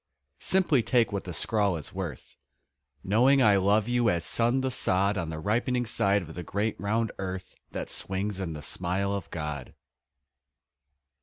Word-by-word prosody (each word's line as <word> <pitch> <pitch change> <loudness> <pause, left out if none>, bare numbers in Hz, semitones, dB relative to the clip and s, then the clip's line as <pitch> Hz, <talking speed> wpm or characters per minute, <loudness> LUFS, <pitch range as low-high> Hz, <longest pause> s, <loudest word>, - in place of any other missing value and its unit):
Simply 175 -9 +3
take 115 0 +2
what 100 -1 -3
the 90 - -5
scrawl 100 +3 0
is 75 - -8
worth 90 -8 -6 0.7
Knowing 125 +8 +4
I 105 -3 +6
love 100 +3 +3
you 120 -1 +2
as 85 -3 0
sun 120 +3 +2
the 130 0 -1
sod 100 -3 +2
On 85 -4 -2
the 80 - -5
ripening 120 +8 0
side 100 -3 +2
of 80 -1 -10
the 90 - -6
great 100 +5 -2
round 110 +2 0
earth 95 -1 -5 0.2
That - - -5
swings 95 +1 -3
in 90 -4 -3
the 75 -1 -8
smile 95 +5 -1
of 100 -4 -4
God. 75 -5 -5
100 Hz, 165 wpm, -28 LUFS, 90-115 Hz, 0.7 s, I